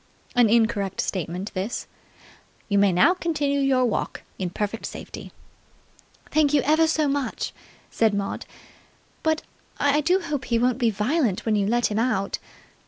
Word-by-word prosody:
An 245 -3 +5
incorrect 220 -4 +1
statement 180 +2 -3
this. 195 +5 -3 0.8
"You 200 -1 +3
may 200 -1 +5
now 180 - +5
continue 295 -6 -1
your 265 -2 +3
walk 230 - -2 0.2
in 185 -2 -1
perfect 210 +4 -3
safety." - - -9 1.0
"Thank 295 -1 +3
you 280 - +3
ever 315 +3 +4
so 315 -2 +1
much," 280 -1 -2 0.4
said 225 -1 +3
Maud. 200 -1 -3 0.7
"But 315 0 +1 0.4
I 285 +1 +3
do 355 +5 +3
hope 295 -7 -3
he 235 -1 +1
won't 250 +2 +1
be 235 -3 +3
violent 225 - 0
when 220 -2 +2
you 200 -1 +1
let 240 +1 +1
him 210 - 0
out." 210 -5 0
240 Hz, 155 wpm, -24 LUFS, 205-290 Hz, 1.0 s, An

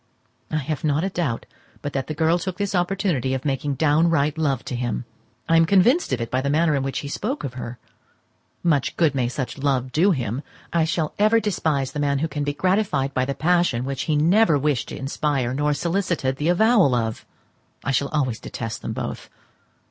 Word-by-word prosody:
I - - -3
have 150 -1 -3
not 150 +1 +1
a 195 - 0
doubt 155 -11 -2 0.4
but 145 - -4
that 135 -1 -2
the 155 - -4
girl 160 +3 +2
took 185 0 -4
this 200 -1 -2
opportunity 175 - 0
of 130 - -5
making 140 0 -1
downright 155 0 +2
love 140 -5 -1
to 125 - -4
him. 120 0 -2 0.4
I 165 - +4
am 165 0 +5
convinced 215 - +4
of 130 - 0
it 115 -1 -4
by 130 - +1
the 140 - -1
manner 155 +2 +3
in 140 - 0
which 135 0 -2
he 145 - -6
spoke 235 - -3
of 135 - -4
her. 125 -1 -6 0.9
Much 150 -6 +1
good 160 -4 +3
may 130 -3 0
such 130 +2 -4
love 130 -2 0
do 165 +9 +3
him! 125 - -1 0.3
I 165 -2 +3
shall 160 -1 -1
ever 215 +2 +5
despise 155 - -1
the 150 - -5
man 140 -1 +1
who 155 +4 0
can 145 -1 -3
be 145 - 0
gratified 185 -7 +1
by 130 -1 +1
the 140 +1 -3
passion 170 -7 +2
which 135 -1 -3
he 155 - +3
never 170 +2 +4
wished 140 -3 0
to - - -6
inspire, 135 -2 -1
nor 145 +2 +1
solicited 170 -4 -1
the 150 +4 0
avowal 195 - +4
of. 115 -2 -2 0.6
I 135 - -1
shall 135 +2 +1
always 130 -7 -1
detest 115 -1 -6
them - - -4
both. - - -5
145 Hz, 210 wpm, -23 LUFS, 135-170 Hz, 0.9 s, am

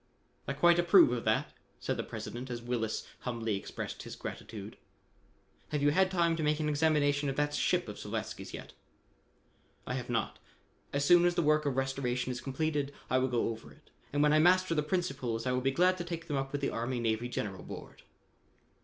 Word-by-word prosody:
"I 135 - -1
quite 175 +4 +5
approve 175 -4 +7
of 120 -1 -2
that," - - +1 0.3
said - - -1
the - - -2
President 125 +2 -6
as 120 -1 -3
Willis 115 -2 -2
humbly 115 -3 -2
expressed 100 - -6
his - - -8
gratitude. - - -7 0.9
"Have 150 -1 -1
you 145 - +5
had 190 +4 +3
time 170 -3 +2
to - - -2
make 150 0 +1
an 155 - 0
examination 145 -1 +2
of 135 - -2
that 145 0 0
ship - - +1
of - - -7
Slavatsky's, - - -5
yet?" - - -8 1.1
"I - - -3
have 125 -1 -4
not. 115 -3 -1 0.5
As 140 0 0
soon 175 +3 +7
as 175 0 +2
the 170 - +2
work 150 0 +3
of 135 -2 -1
restoration 130 -2 -1
is 125 0 -5
completed, 145 +1 -1 0.2
I 130 - +4
will 130 - +2
go 120 -3 0
over 115 0 -7
it, 150 - -21 0.2
and 145 +1 +2
when 150 0 +4
I 155 - +5
master 185 +1 +4
the 150 - +2
principles 135 -9 -2
I 125 - +1
will 125 0 +1
be 135 - +2
glad 180 +6 +3
to - - -2
take 170 -1 -5
them 150 - -2
up 135 0 -2
with 145 - -3
the 140 - 0
Army 120 +2 -2
Navy 115 +1 0
General 100 -6 -4
Board." - - -9
140 Hz, 205 wpm, -31 LUFS, 125-155 Hz, 1.1 s, approve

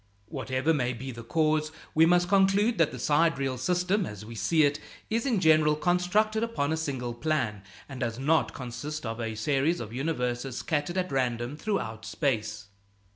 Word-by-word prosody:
Whatever 130 +7 0
may 125 -4 0
be 130 +3 -6
the 115 -1 -8
cause, 155 +3 +1 0.2
we 160 +1 +5
must 175 +1 +4
conclude 195 +2 +3
that 165 - +4
the 125 - -7
sidereal 140 -2 +1
system, 180 - +1
as 105 0 -8
we 115 - -9
see 155 +8 +2
it, 145 0 +2 0.3
is 230 +4 0
in 235 -7 +2
general 155 -3 +4
constructed 180 +6 +1
upon 230 -11 -1
a - - +2
single 130 -6 -3
plan, 120 -6 -1 0.3
and 135 -2 -8
does 115 -3 -2
not 155 +5 +2
consist 145 +3 -6
of 115 +1 -4
a 110 -1 -3
series 140 +8 +1
of 115 -1 -7
universes 125 -3 -2
scattered 160 +3 -2
at 185 0 -1
random 125 0 -1
throughout 115 - -3
space. 110 -5 -2
145 Hz, 175 wpm, -28 LUFS, 120-170 Hz, 0.3 s, we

